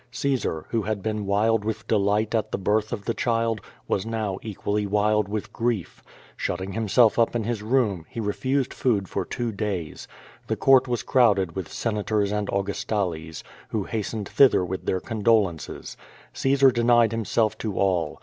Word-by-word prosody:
Caesar, 120 - -1
who 115 - 0
had 105 -1 -3
been 105 -2 -2
wild 105 +2 +2
with 110 0 -4
delight 105 +1 +1
at 110 -2 0
the - - -1
birth, 105 +2 0
of 105 -4 -4
the 115 - 0
child, 115 -3 0 0.3
was 95 - 0
now 110 -4 -3
equally 105 -1 -2
wild 105 0 +2
with 105 0 -4
grief. 115 -6 -2 0.3
Shutting 95 +2 -3
himself 110 +3 +3
up 115 +1 +2
in 115 - 0
his 115 -1 -2
room, 105 -7 0
he - - -7
re 105 -2 -1
fused 135 0 -1
food 105 -7 0
for - - -2
two 120 -1 -3
days. 100 -6 -4 0.4
The - - 0
Court 130 -1 +5
was 120 -2 -1
crowded 100 -9 +3
with 95 -4 -5
Sena 105 -3 -2
tors 105 -1 0
and 105 -1 -1
Augustales, 95 -5 -2 0.3
who 110 -3 -1
hastened 105 0 -4
thither 130 -9 +4
with 95 +1 -5
their 95 - 0
condo 110 +1 +2
lences. 85 -5 -7 0.4
Caesar 135 0 +4
denied 120 -1 +4
himself 110 -1 0
to 105 -4 -4
all. 90 -5 0
105 Hz, 175 wpm, -25 LUFS, 100-115 Hz, 0.4 s, Court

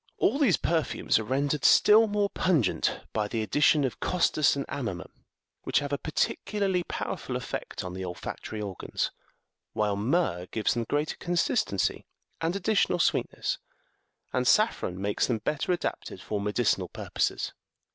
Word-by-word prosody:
All 275 - +2
these 255 - +4
perfumes 160 -8 +1
are - - -3
rendered 140 +5 0
still 220 +2 +7
more 205 -1 0
pungent 150 - +1
by 105 -1 0
the 110 +1 -2
addi 145 - -1
tion 150 0 +5
of 130 - -2
costus 155 -6 +2
and 140 - -3
amomum, 100 -10 -5 0.5
which - - 0
have 145 0 -1
a 140 - 0
particularly 195 +4 0
power - - -3
ful - - -5
effect - - -4
on 90 -1 -6
the 95 +1 -5
olfactory 90 +4 -6
organs; 100 -3 -3 0.6
while 105 -1 +1
myrrh 105 - 0
gives 110 +2 0
them 120 -1 -2
greater 145 +1 -1
consistency 175 -1 0 0.3
and 165 +3 0
additional 200 -2 +2
sweetness, 170 - 0 0.7
and 125 -1 +1
saffron 210 - +2
makes 100 +1 0
them 120 - +1
better 150 +9 -1
adapted 175 - -3
for 105 -1 -3
medicinal 105 -3 +1
purposes. - - -2
140 Hz, 150 wpm, -28 LUFS, 105-175 Hz, 0.7 s, still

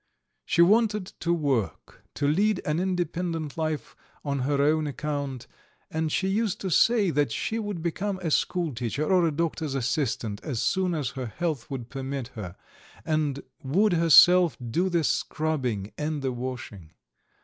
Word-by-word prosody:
She 170 - +4
wanted 210 +1 +3
to 170 - 0
work, 135 - -1
to 145 - 0
lead 200 +6 +2
an 150 +2 0
independent 175 -4 -2
life 155 -2 -3 0.3
on 140 -1 -1
her 140 +2 0
own 155 +2 +2
account, 140 -2 -4 0.5
and 160 0 -1
she 190 - 0
used 205 0 0
to 190 - -3
say 210 +1 +4
that 145 -4 +1
she 225 - -2
would 205 -6 -4
become 190 +4 -2
a 165 - -1
school 170 -1 0
teacher 120 +5 -2
or 180 -1 +3
a - - 0
doctor's 155 -2 -2
assistant 120 -5 -1
as 130 -7 -3
soon 185 +4 +1
as 140 -5 -2
her 130 -3 -5
health 155 0 -3
would 125 -4 -6
permit 135 -2 -4
her, 100 -8 -8 0.5
and 155 -3 0 0.2
would 185 +9 +2
herself 170 +1 +6
do 180 +9 +1
the 170 -2 +1
scrubbing 135 -10 -1
and 150 -1 -2
the 130 - 0
washing. 120 -9 -6
155 Hz, 160 wpm, -26 LUFS, 135-175 Hz, 0.5 s, herself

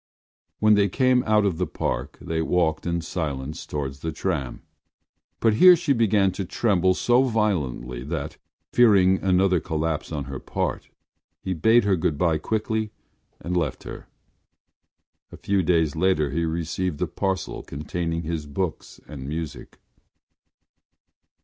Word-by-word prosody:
When 110 0 +4
they 100 -1 +3
came 130 +4 +3
out 105 -1 +3
of 90 -4 -1
the 90 - 0
Park 60 +3 -3
they 80 0 -2
walked 80 -1 0
in 85 0 -1
silence 75 -4 -4
towards 70 -2 -4
the 80 +3 -3
tram; 80 -6 -3 0.8
but 115 -2 +3
here 180 +11 +8
she 165 -4 +1
began 105 -5 +3
to 95 - -4
tremble 95 -1 +1
so 120 +5 +3
violently 80 - -1
that, 75 -1 -4 0.4
fearing 95 -6 +5
another 95 -1 +2
collapse 80 0 -3
on 75 -3 -3
her 70 -1 -7
part, - - -3 0.5
he 95 - -2
bade 110 +8 +4
her 100 -1 +2
good 80 -3 -1
bye 80 -1 +1
quickly 110 +3 -2 0.5
and 90 +1 -3
left 80 -7 -1
her. - - -9 1.2
A - - -10
few 100 -1 0
days 80 -3 +1
later 80 -5 +1
he 85 +3 0
received 80 0 -2
a - - +1
parcel 95 -1 -3
containing 80 +3 -4
his 80 -2 -4
books 80 +4 -4
and 70 -2 -8
music. 80 0 -6
85 Hz, 145 wpm, -24 LUFS, 75-100 Hz, 1.2 s, here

